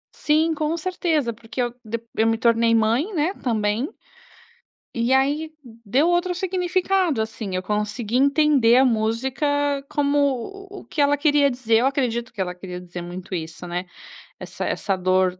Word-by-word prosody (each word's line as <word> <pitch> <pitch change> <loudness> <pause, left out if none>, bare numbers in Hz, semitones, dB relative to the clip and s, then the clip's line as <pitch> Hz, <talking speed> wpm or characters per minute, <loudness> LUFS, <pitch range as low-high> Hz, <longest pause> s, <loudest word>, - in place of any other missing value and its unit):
Sim, 315 +2 +2
com 310 +1 -1
certeza 320 -7 -1
porque 225 +3 -10
eu 240 -1 +1
de 230 +1 -4 0.2
eu 220 - +2
me 225 0 +2
tornei 230 0 +3
mãe, 230 - +2
né, 320 +4 +1
também, 225 - -1 1.0
e 235 +2 +1
aí 285 +4 +1
deu 235 - 0
outro 350 +1 +1
significado 365 - 0
assim, 220 -3 -4
eu 185 - -2
consegui 210 +3 -2
entender 280 -3 +4
a 260 - +6
música 235 +5 0 0.4
como, 290 0 +1 0.6
o 395 - -7
o - - -15
que - - -7
ela 285 0 +4
queria 290 -1 +3
dizer. 245 -3 +1
Eu 240 - +2
acredito 250 -3 -1
que 200 - -4
ela 180 -1 -2
queria 180 0 -8
dizer 175 0 -8
muito 180 +2 -8
isso, 165 0 -5
né. 175 +1 -3 0.5
Essa - - -5
essa 195 -2 -1
dor 185 0 +1
240 Hz, 165 wpm, -23 LUFS, 215-300 Hz, 1.0 s, a